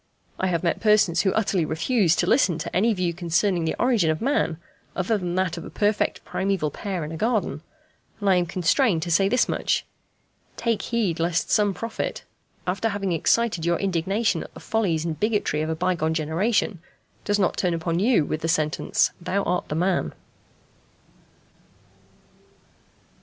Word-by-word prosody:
I 190 Hz, -, +1 dB
have 170 Hz, -2 st, -1 dB
met 170 Hz, -, 0 dB
persons 210 Hz, -5 st, +3 dB
who 190 Hz, -, +2 dB
utterly 195 Hz, -5 st, +1 dB
refuse 170 Hz, +3 st, +1 dB
to -, -, +1 dB
listen 180 Hz, -, +3 dB
to 155 Hz, -, -6 dB
any 220 Hz, +5 st, +3 dB
view 180 Hz, -4 st, -1 dB
concerning 175 Hz, +1 st, 0 dB
the 160 Hz, -, -1 dB
origin 235 Hz, -10 st, +2 dB
of 155 Hz, -, 0 dB
man 230 Hz, -, 0 dB, 0.4 s
other 195 Hz, +4 st, 0 dB
than 180 Hz, -4 st, -3 dB
that 185 Hz, -2 st, 0 dB
of 170 Hz, -, -6 dB
a -, -, -8 dB
perfect 205 Hz, 0 st, 0 dB
primæval 190 Hz, -6 st, -1 dB
pair 190 Hz, -5 st, -4 dB
in 155 Hz, -, -7 dB
a 160 Hz, -, -5 dB
garden, 210 Hz, -, -1 dB, 0.6 s
and 205 Hz, -, -3 dB
I 190 Hz, -2 st, +5 dB
am 175 Hz, -1 st, +1 dB
constrained 180 Hz, -, +2 dB
to 170 Hz, -, -4 dB
say 195 Hz, +4 st, +3 dB
this 250 Hz, -, +2 dB
much: -, -, 0 dB, 0.7 s
Take 230 Hz, -3 st, 0 dB
heed 210 Hz, -9 st, -1 dB
lest 170 Hz, +1 st, 0 dB
some 205 Hz, -2 st, +3 dB
prophet, 230 Hz, -1 st, -4 dB, 0.4 s
after 195 Hz, +5 st, 0 dB
having 200 Hz, -2 st, -2 dB
excited 180 Hz, +2 st, +1 dB
your 170 Hz, 0 st, +1 dB
indignation 195 Hz, +4 st, 0 dB
at -, -, -9 dB
the -, -, -9 dB
follies 175 Hz, -8 st, 0 dB
and 160 Hz, -3 st, -3 dB
bigotry 210 Hz, -8 st, 0 dB
of 155 Hz, -, -2 dB
a 160 Hz, -, -1 dB
bygone 165 Hz, -2 st, 0 dB
generation, 175 Hz, +6 st, 0 dB, 0.4 s
does 205 Hz, 0 st, +1 dB
not 190 Hz, -3 st, +1 dB
turn 180 Hz, -3 st, 0 dB
upon 165 Hz, +1 st, -1 dB
you 215 Hz, -, +3 dB
with 155 Hz, -, -3 dB
the 165 Hz, -, -1 dB
sentence, 155 Hz, -2 st, +1 dB
"Thou 195 Hz, +3 st, -1 dB
art 180 Hz, 0 st, -1 dB
the 150 Hz, -, -2 dB
man." 175 Hz, -, 0 dB
180 Hz, 175 wpm, -24 LUFS, 165-210 Hz, 0.7 s, I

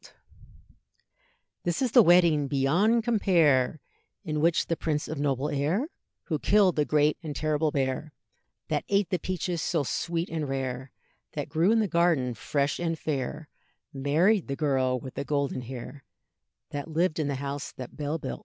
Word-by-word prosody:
This 175 Hz, -1 st, -1 dB
is 255 Hz, -3 st, 0 dB
the 245 Hz, -, +8 dB
wedding 170 Hz, -6 st, +5 dB
beyond 170 Hz, -, +2 dB
compare, 165 Hz, -, +3 dB, 0.4 s
In 155 Hz, -1 st, -2 dB
which 165 Hz, 0 st, +3 dB
the 165 Hz, -, -1 dB
prince 150 Hz, -2 st, -2 dB
of 155 Hz, -2 st, -5 dB
noble 140 Hz, -1 st, 0 dB
air, 160 Hz, -, 0 dB, 0.3 s
Who 155 Hz, -4 st, -2 dB
killed 195 Hz, -1 st, +4 dB
the 150 Hz, -, +2 dB
great 150 Hz, 0 st, +2 dB
and 155 Hz, -4 st, -6 dB
terrible 155 Hz, +1 st, +1 dB
bear, 135 Hz, +2 st, -2 dB, 0.6 s
That -, -, 0 dB
ate 200 Hz, -3 st, +1 dB
the 180 Hz, -, +1 dB
peaches 180 Hz, -2 st, -2 dB
so 165 Hz, -3 st, 0 dB
sweet 170 Hz, +5 st, -2 dB
and 155 Hz, -4 st, -3 dB
rare, 130 Hz, -1 st, -3 dB, 0.4 s
That 145 Hz, 0 st, -4 dB
grew 165 Hz, +6 st, +2 dB
in 225 Hz, 0 st, +4 dB
the 215 Hz, -, +1 dB
garden 170 Hz, -8 st, +2 dB
fresh 140 Hz, +5 st, -1 dB
and 165 Hz, -1 st, -1 dB
fair, 150 Hz, +1 st, -3 dB, 0.5 s
Married 160 Hz, +9 st, +2 dB
the 140 Hz, -, -2 dB
girl 130 Hz, -4 st, +1 dB
with 130 Hz, +1 st, -9 dB
the 140 Hz, -, -3 dB
golden 140 Hz, -2 st, -1 dB
hair, 130 Hz, +2 st, -8 dB, 0.7 s
That 145 Hz, -1 st, -4 dB
lived 160 Hz, +1 st, 0 dB
in 150 Hz, -, 0 dB
the 140 Hz, -, -1 dB
house 140 Hz, +1 st, -4 dB
that 125 Hz, -2 st, -9 dB
Bell 150 Hz, +1 st, -2 dB
built. 65 Hz, -, -5 dB
150 Hz, 165 wpm, -27 LUFS, 140-170 Hz, 0.7 s, the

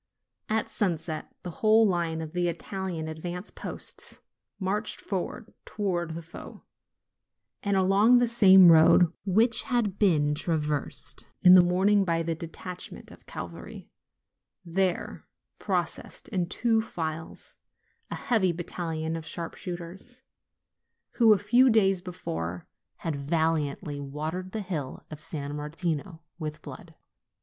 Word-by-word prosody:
At 220 Hz, 0 st, 0 dB
sunset 165 Hz, -6 st, -3 dB
the 180 Hz, -, -5 dB
whole 220 Hz, 0 st, +5 dB
line 170 Hz, -3 st, -1 dB
of 155 Hz, -1 st, -7 dB
the 175 Hz, 0 st, 0 dB
Italian 170 Hz, -1 st, -4 dB
advance 175 Hz, +4 st, -6 dB
posts -, -, -6 dB, 0.4 s
marched 205 Hz, +3 st, -2 dB
forward 200 Hz, +3 st, -5 dB
towards 175 Hz, -6 st, -2 dB
the 170 Hz, -, -6 dB
foe; 165 Hz, -, -11 dB, 1.0 s
and 200 Hz, -1 st, +1 dB
along 200 Hz, +6 st, +5 dB
the 245 Hz, 0 st, +3 dB
same 190 Hz, -6 st, +8 dB
road 165 Hz, +1 st, +6 dB
which 225 Hz, +5 st, +4 dB
had 230 Hz, -7 st, -1 dB
been 150 Hz, -8 st, +3 dB
traversed 150 Hz, -2 st, 0 dB, 0.2 s
in 180 Hz, -, +9 dB
the 185 Hz, -, +10 dB
morning 195 Hz, +3 st, +3 dB
by 165 Hz, -2 st, 0 dB
the 165 Hz, 0 st, -1 dB
detachment 170 Hz, +2 st, -8 dB
of -, -, -16 dB
cavalry, -, -, -8 dB, 0.7 s
there 180 Hz, +1 st, -1 dB, 0.3 s
proceeded, -, -, -3 dB
in 180 Hz, -5 st, -1 dB
two 225 Hz, +1 st, +1 dB
files, 160 Hz, -6 st, -6 dB, 0.5 s
a -, -, -4 dB
heavy 215 Hz, -8 st, +1 dB
battalion 165 Hz, -2 st, -4 dB
of 165 Hz, -, -5 dB
sharpshooters, 175 Hz, +8 st, -6 dB, 0.9 s
who, 230 Hz, -3 st, +6 dB
a 210 Hz, -, +6 dB
fewi 240 Hz, +6 st, +4 dB
days 195 Hz, -5 st, +3 dB
before, 90 Hz, -, -5 dB, 0.4 s
had 160 Hz, -3 st, -1 dB
valiantly 150 Hz, 0 st, -1 dB
watered 155 Hz, +6 st, -5 dB
the 220 Hz, -, -3 dB
hill 160 Hz, -9 st, -5 dB
of 155 Hz, 0 st, -8 dB
San 145 Hz, -2 st, -5 dB
Mar 150 Hz, 0 st, -5 dB
tino 165 Hz, 0 st, -4 dB, 0.2 s
with 155 Hz, -1 st, -6 dB
blood. -, -, -10 dB
175 Hz, 125 wpm, -27 LUFS, 160-200 Hz, 1.0 s, the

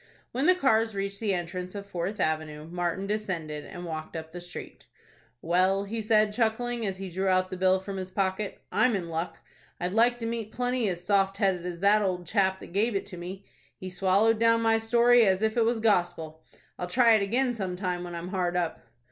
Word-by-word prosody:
When 270 Hz, +6 st, 0 dB
the 365 Hz, -, +6 dB
cars 225 Hz, -, +2 dB
reached 200 Hz, 0 st, -3 dB
the 205 Hz, -4 st, 0 dB
entrance 180 Hz, +2 st, -5 dB
of 200 Hz, 0 st, -6 dB
Fourth 195 Hz, +2 st, -4 dB
Avenue, 155 Hz, -2 st, -2 dB
Martin 175 Hz, +2 st, -2 dB
descended, 180 Hz, -8 st, -3 dB
and 175 Hz, -2 st, -8 dB
walked 155 Hz, -1 st, -6 dB
up 160 Hz, 0 st, -6 dB
the 175 Hz, +1 st, -7 dB
street. 175 Hz, 0 st, -9 dB, 0.6 s
"Well," 185 Hz, +4 st, +2 dB
he 220 Hz, +3 st, -4 dB
said, 215 Hz, -1 st, +3 dB
chuckling, 235 Hz, +1 st, 0 dB
as 190 Hz, -1 st, -3 dB
he 195 Hz, 0 st, -5 dB
drew 190 Hz, +3 st, -1 dB
out 185 Hz, 0 st, +2 dB
the -, -, -3 dB
bill 185 Hz, +1 st, +3 dB
from 195 Hz, +1 st, -6 dB
his 185 Hz, 0 st, -5 dB
pocket, 190 Hz, +1 st, -2 dB
"I'm 250 Hz, -3 st, +3 dB
in 175 Hz, -4 st, -3 dB
luck. 165 Hz, +2 st, -3 dB, 0.4 s
I'd 180 Hz, +1 st, -2 dB
like 240 Hz, +2 st, +4 dB
to 230 Hz, -, -5 dB
meet 230 Hz, -2 st, -3 dB
plenty 245 Hz, -2 st, 0 dB
as 175 Hz, -1 st, -4 dB
soft 195 Hz, 0 st, +2 dB
headed 185 Hz, -3 st, +1 dB
as 175 Hz, -1 st, -6 dB
that 205 Hz, +2 st, +5 dB
old 180 Hz, -3 st, -1 dB
chap 190 Hz, +1 st, +1 dB
that -, -, -11 dB
gave 215 Hz, +3 st, +1 dB
it 195 Hz, -, -1 dB
to 180 Hz, -, -9 dB
me. 185 Hz, +3 st, -7 dB, 0.3 s
He 185 Hz, 0 st, -7 dB
swallowed 195 Hz, +5 st, +3 dB
down 230 Hz, 0 st, +4 dB
my 225 Hz, 0 st, +3 dB
story, 235 Hz, +1 st, +5 dB
as 190 Hz, 0 st, +2 dB
if 220 Hz, 0 st, +1 dB
it 230 Hz, -2 st, +3 dB
was 230 Hz, 0 st, +1 dB
gospel. 175 Hz, -7 st, 0 dB, 0.4 s
I'll 180 Hz, -, -3 dB
try 230 Hz, +5 st, +5 dB
it 215 Hz, -, +4 dB
again 245 Hz, +5 st, +1 dB
some 190 Hz, -5 st, -3 dB
time 180 Hz, -1 st, -3 dB
when 175 Hz, -1 st, -6 dB
I'm 170 Hz, +1 st, -5 dB
hard 180 Hz, -2 st, -1 dB
up." 170 Hz, -2 st, -2 dB
195 Hz, 215 wpm, -28 LUFS, 180-220 Hz, 0.6 s, the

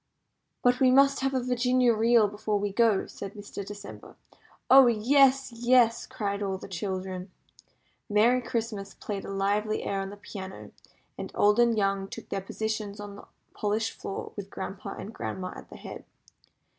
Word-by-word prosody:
"But 245 Hz, 0 st, +4 dB
we 260 Hz, -, +5 dB
must 275 Hz, +2 st, +5 dB
have 270 Hz, 0 st, 0 dB
a 255 Hz, -, 0 dB
Virginia 250 Hz, 0 st, +3 dB
Reel 225 Hz, 0 st, +4 dB
before 210 Hz, +1 st, -2 dB
we 205 Hz, 0 st, -2 dB
go," 225 Hz, -3 st, +3 dB
said 200 Hz, +1 st, -8 dB
Mr. 205 Hz, -1 st, -7 dB
December. 205 Hz, 0 st, -10 dB, 0.5 s
"Oh, 265 Hz, -1 st, +8 dB
yes, 265 Hz, +4 st, +4 dB
yes!" 235 Hz, 0 st, +3 dB
cried 205 Hz, -6 st, -3 dB
all 195 Hz, -2 st, -1 dB
the -, -, -10 dB
children. 185 Hz, 0 st, -4 dB, 0.8 s
Merry 230 Hz, +5 st, +4 dB
Christmas 220 Hz, -5 st, -4 dB
played 200 Hz, -2 st, -5 dB
a -, -, -7 dB
lively 205 Hz, +2 st, 0 dB
air 195 Hz, -1 st, -1 dB
on 195 Hz, -, -4 dB
the 205 Hz, -, -10 dB
piano, 190 Hz, -2 st, -9 dB, 0.5 s
and -, -, -5 dB
old 210 Hz, +2 st, +4 dB
and 235 Hz, -2 st, +4 dB
young 195 Hz, -1 st, 0 dB
took -, -, -9 dB
their 195 Hz, -, -2 dB
positions 215 Hz, +1 st, -4 dB
on 205 Hz, -1 st, -7 dB
the -, -, -13 dB, 0.3 s
polished 215 Hz, +2 st, -1 dB
floor 195 Hz, -, -6 dB
with 200 Hz, -1 st, -7 dB
grandpa 190 Hz, 0 st, -6 dB
and 215 Hz, -, -8 dB
grandma 185 Hz, -4 st, -5 dB
at -, -, -11 dB
the -, -, -11 dB
head. -, -, -9 dB
210 Hz, 170 wpm, -28 LUFS, 200-240 Hz, 0.8 s, Oh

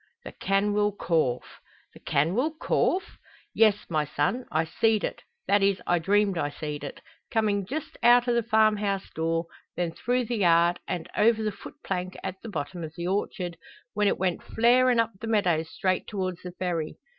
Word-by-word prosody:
"The -, -, -8 dB
canwyll 205 Hz, +1 st, 0 dB
corph!" 155 Hz, -8 st, -1 dB, 0.3 s
"The -, -, -14 dB
canwyll 235 Hz, -, 0 dB
corph?" 370 Hz, +3 st, 0 dB, 0.3 s
"Yes, 215 Hz, -2 st, +3 dB
my 155 Hz, -3 st, 0 dB
son; 150 Hz, -, -1 dB
I 155 Hz, +1 st, +2 dB
seed 215 Hz, +6 st, +1 dB
it -, -, -3 dB, 0.3 s
that 205 Hz, 0 st, +4 dB
is 195 Hz, -1 st, +2 dB
I 175 Hz, 0 st, +2 dB
dreamed 200 Hz, +1 st, +2 dB
I 145 Hz, -, 0 dB
seed 150 Hz, 0 st, -6 dB
it 140 Hz, -, -7 dB, 0.3 s
coming 205 Hz, -4 st, 0 dB
just 300 Hz, +6 st, -5 dB
out 240 Hz, +1 st, +6 dB
o' 240 Hz, -, +3 dB
the 235 Hz, -, +2 dB
farm 220 Hz, -1 st, +3 dB
house 200 Hz, -2 st, -2 dB
door, 165 Hz, +1 st, -1 dB, 0.3 s
then 175 Hz, -1 st, -1 dB
through 245 Hz, +7 st, -1 dB
the 235 Hz, +1 st, -2 dB
yard, 170 Hz, -2 st, +4 dB
and 175 Hz, -3 st, -3 dB
over 220 Hz, 0 st, +3 dB
the 215 Hz, -, 0 dB
foot -, -, -11 dB
plank 185 Hz, -1 st, -3 dB
at 190 Hz, -, -5 dB
the 230 Hz, -, -7 dB
bottom 170 Hz, 0 st, -5 dB
o' 160 Hz, -, -4 dB
the 170 Hz, -, -4 dB
orchard, 185 Hz, -2 st, -2 dB, 0.4 s
when 210 Hz, 0 st, +2 dB
it -, -, +2 dB
went 185 Hz, -1 st, -1 dB
flarin' 245 Hz, +1 st, +3 dB
up 230 Hz, 0 st, +2 dB
the 225 Hz, -, -6 dB
meadows 175 Hz, -7 st, +1 dB
straight 185 Hz, 0 st, -1 dB
towards 185 Hz, -4 st, -3 dB
the 180 Hz, -1 st, -8 dB
ferry. 170 Hz, -4 st, -3 dB
195 Hz, 185 wpm, -27 LUFS, 170-220 Hz, 0.4 s, out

